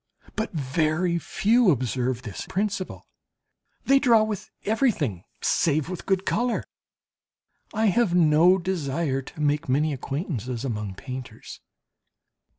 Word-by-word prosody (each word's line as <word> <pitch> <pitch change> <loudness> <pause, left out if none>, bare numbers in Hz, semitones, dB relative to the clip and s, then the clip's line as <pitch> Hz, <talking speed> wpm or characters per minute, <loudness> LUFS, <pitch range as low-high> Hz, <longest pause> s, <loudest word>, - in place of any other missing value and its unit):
But 220 - -2
very 160 +4 0
few 225 +5 +3
observe 125 -3 0
this 105 -5 -6
principle, 195 -1 -3 0.8
they 275 0 +5
draw 230 -5 +5
with 215 -3 -4 0.2
everything, 195 - 0 0.2
save 155 -1 +1
with 185 -2 -6
good 190 -1 +1
colour. 245 +2 0 1.1
I 220 +1 0
have 215 -6 +2
no 170 +2 +5
desire 160 -6 -1
to 135 - -12
make 145 -1 0
many 150 +3 +2
acquaintances 135 - -4
among 105 -6 -3
painters. 125 -1 -8
155 Hz, 115 wpm, -25 LUFS, 130-195 Hz, 1.1 s, they